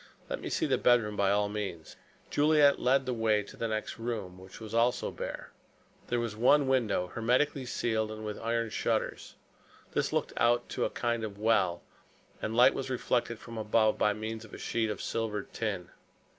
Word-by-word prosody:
Let - - -3
me - - -4
see - - 0
the - - +1
bedroom 115 -4 +3
by 100 -1 +2
all 105 +1 +2
means." 100 -6 -5 0.4
Juliet 145 -1 +4
led 130 +2 +3
the 125 - -1
way 110 -2 +2
into 100 - -11
the 115 - -2
next 110 +1 -3
room, 105 -6 -4
which 95 0 -12
was 110 -1 -8
also 120 +2 +2
bare. - - -6 0.6
There 120 - 0
was 115 -2 -3
one 135 +5 +4
window 110 -9 +1
hermetically 125 - +1
sealed 110 -3 -1
and 110 0 -7
with 105 -1 -5
iron 115 -1 -1
shutters. - - -2 0.6
This - - 0
looked - - -1
out 120 +1 +4
on - - -28
to - - -1
a - - 0
kind 120 -1 -1
of 105 -2 -5
well, 100 -5 +2 0.6
and 110 +1 -2
light 125 - +7
was 135 -1 -4
reflected 120 -2 0
from 115 0 -8
above 110 0 +2
by 105 - +3
means 110 +1 -5
of 110 - -11
a - - -8
sheet 115 -2 -1
of 105 - -4
silvered 105 -3 -3
tin. 100 -6 -3
110 Hz, 195 wpm, -30 LUFS, 105-120 Hz, 0.6 s, light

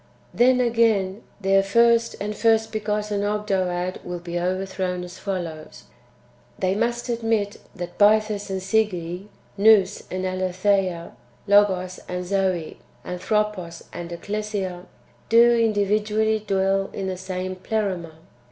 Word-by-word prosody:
5. - - -15
Then, 255 +1 +5
again, 225 -4 +2 0.2
their 195 0 +3
first 230 +3 +3
and 210 +1 -3
first 225 0 +2
begotten 210 -1 -2
Ogdoad 190 -4 -1
vrill 180 0 -5
be 175 0 -3
overthrown 185 0 -2
as 180 0 -10
follows: 170 -6 -5 0.7
They 185 0 +1
must 235 +3 -1
admit 225 -3 -1 0.2
that 175 -1 -7
Bythus 210 -1 +3
and 190 -1 -3
Sige, 190 -3 -1 0.3
Nous 205 -2 +5
and 185 0 -3
Aletheia, 185 -1 0 0.3
Logos 190 -3 +3
and 180 0 -3
Zoe, 185 -3 -1 0.3
Antbropos 180 -1 -2
and 175 0 -6
Ecclesia, 195 -1 -4 0.4
do 235 +1 +6
individually 215 0 +1
dwell 195 0 +1
in 195 - -4
the 190 -1 -2
same 185 0 -4
Pleroma. 185 -4 -2
195 Hz, 120 wpm, -23 LUFS, 185-215 Hz, 0.7 s, do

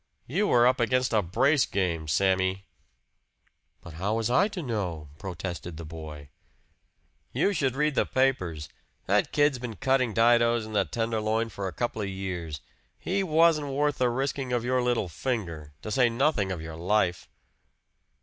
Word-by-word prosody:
"You 195 - 0
were 120 -7 +5
up 125 +2 +3
against 125 +1 +1
a 110 - +4
brace 125 - +2
game, 85 -5 -1
Sammy!" 95 +3 +1 1.2
"But 85 - -11
how 105 +3 0
was 115 +1 -1
I 185 +11 +4
to 195 -5 -6
know?" 90 - -3
protested 90 -2 -6
the 85 - -7
boy. 75 -3 -9 1.0
"You 205 - +2
should 135 -7 0
read 150 +1 +1
the - - +1
papers. 95 - 0 0.4
That - - +1
kid's 145 -3 +2
been 120 -3 -6
cutting 130 -1 +1
didoes 115 0 +4
in 110 - -9
the 105 - +2
Tenderloin 115 0 -1
for 100 -2 -5
a - - -4
couple 115 +4 -3
of 100 - -2
years. 90 -6 -5 0.4
He 195 +2 -1
wasn't 160 -3 +3
worth 145 +1 0
the 125 -1 +3
risking 135 +1 -2
of 120 -1 0
your 130 0 +1
little 120 -5 0
finger 85 - -4
to 110 - -5
say 125 0 +4
nothing 115 -5 +1
of 85 -4 -4
your 80 -1 -7
life." 90 0 0
115 Hz, 165 wpm, -27 LUFS, 95-130 Hz, 1.2 s, were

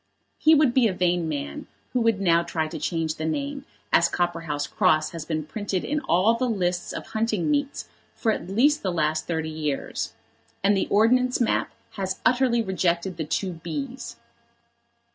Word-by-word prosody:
He 315 0 +6
would 290 -5 +4
be 250 -3 +4
a 200 - -1
vain 175 -2 +1
man 155 - -4 0.3
who 250 - +2
would 225 -3 +2
now 170 -3 +4
try 160 -2 -2
to 155 - -6
change 160 0 -1
the 160 - -3
name, 280 - -3 0.3
as - - +5
Copperhouse 165 -4 -1
Cross 155 -6 +2
has 165 -2 -6
been 155 -2 -2
printed 195 +2 -3
in 300 +1 0
all 190 - +3
the 250 +2 0
lists 180 -5 -1
of - - -6
hunting 220 - 0
meets 285 -1 -1 0.3
for 225 - +1
at 185 - -4
least 280 +9 +3
the 190 - -1
last 155 -2 0
thirty 160 -2 -2
years; 150 -3 -3 0.5
and 200 +1 +4
the 195 - 0
Ordnance 250 +4 +3
map 240 - +1 0.3
has 190 -1 -2
utterly 245 -2 +3
rejected 185 -2 0
the 160 - -2
two 185 +5 -1
b's. 240 - -6
190 Hz, 175 wpm, -25 LUFS, 165-235 Hz, 0.5 s, He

